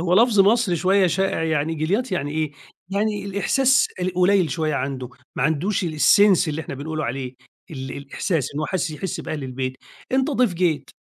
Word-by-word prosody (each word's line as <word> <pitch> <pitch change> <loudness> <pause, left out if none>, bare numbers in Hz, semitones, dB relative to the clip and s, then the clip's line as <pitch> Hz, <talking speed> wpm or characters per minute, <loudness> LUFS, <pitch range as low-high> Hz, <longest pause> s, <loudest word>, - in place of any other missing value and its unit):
هو 175 +1 +1
لفظ 220 0 +5
مصري 205 -2 +3
شوية 190 +3 +3
شائع 190 0 0
يعني، 160 0 0
جِلياط 195 +9 -1
يعني 145 -5 -1
إيه، 155 -1 -2 0.4
يعني 205 +1 -1
الإحساس 260 +8 +2
القليل 185 -1 +2
شوية 155 0 -1
عنده، 130 -2 -3 0.3
ما - - 0
عندوش 165 +8 0
الsense 175 +3 +4
اللي 155 +1 -2
إحنا 135 - -7
بنقول 155 +3 -4
عليه، 130 0 -4 0.4
ال 135 -3 -6
الإحساس 140 - -3
إنه 155 +2 -2
حس 180 -3 -1
يحس 155 +3 -4
بأهل 150 -2 -5
البيت، 130 0 -4 0.4
أنت 265 +2 +2
ضيف 245 -8 +1
جيت 170 -5 0
170 Hz, 170 wpm, -22 LUFS, 145-200 Hz, 0.4 s, لفظ